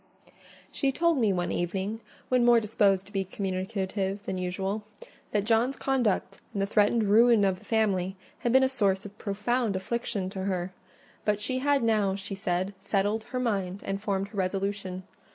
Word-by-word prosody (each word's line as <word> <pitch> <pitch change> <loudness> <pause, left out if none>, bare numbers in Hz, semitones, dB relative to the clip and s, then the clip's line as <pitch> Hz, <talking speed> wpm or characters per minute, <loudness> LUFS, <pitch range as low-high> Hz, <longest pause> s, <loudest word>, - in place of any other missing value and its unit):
She 275 -2 +1
told 335 +1 +2
me 220 -4 +3
one 175 -2 -1
evening, 190 +5 -2 0.3
when 250 -1 +3
more 240 -1 +6
disposed 200 -3 +2
to 205 - -17
be 195 -2 0
communicative 190 +1 -3
than 185 - -3
usual, 190 +3 -2 0.5
that 205 -1 +1
John's 230 +5 +2
conduct, 255 -8 0
and 200 - -1
the - - +2
threatened 210 +2 +3
ruin 225 +1 +5
of 190 -2 +1
the - - -19
family, 195 -4 +1 0.2
had 240 -1 0
been 265 +2 +6
a - - +5
source 200 -7 +1
of 205 0 -9
profound 215 +2 0
affliction 195 -1 -2
to 190 -1 -4
her: 185 -1 -2 0.5
but 210 -1 +1
she 255 +5 -1
had 280 -1 +2
now, 210 -4 +2
she 195 0 -6
said, 190 0 -1
settled 205 +2 0
her 255 - -3
mind, 200 -6 -1
and 195 0 -2
formed 200 -2 -1
her 205 - -10
resolution. 190 0 -2
200 Hz, 175 wpm, -28 LUFS, 190-230 Hz, 0.5 s, more